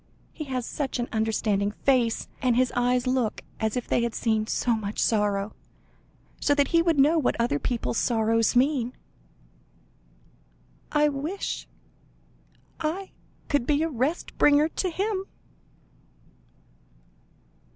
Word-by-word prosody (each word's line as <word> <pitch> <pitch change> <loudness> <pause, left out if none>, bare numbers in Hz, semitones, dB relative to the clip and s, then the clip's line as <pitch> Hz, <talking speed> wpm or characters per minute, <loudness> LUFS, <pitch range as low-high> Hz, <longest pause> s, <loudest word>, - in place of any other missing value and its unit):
He 305 - -6
has 255 -3 -3
such 275 +1 -3
an 240 0 -2
understanding 215 -2 0
face, 235 +1 +1
and 250 -3 +2
his 255 0 +2
eyes 245 +1 +2
look 255 -4 0 0.2
as 220 +1 -1
if 245 - -3
they - - +2
had 235 -1 -2
seen 220 -2 0
so 235 0 +1
much 210 -1 -5
sorrow, 205 -2 +1 0.9
so 290 - +2
that 285 -1 +2
he 335 -1 +4
would 335 -2 +2
know 300 +4 +5
what 255 - 0
other 235 -11 +1
people's 235 - -1
sorrows 225 0 +2
mean. 255 -1 +2 2.0
I 300 0 +4
wish 295 +8 -4 1.1
I 345 +5 -3 0.4
could 285 -5 0
be 295 +1 +2
a 325 - 0
rest 280 +5 -2
bringer 295 +2 +5
to 370 - -2
him." 385 +2 -2
250 Hz, 130 wpm, -26 LUFS, 225-295 Hz, 2.0 s, know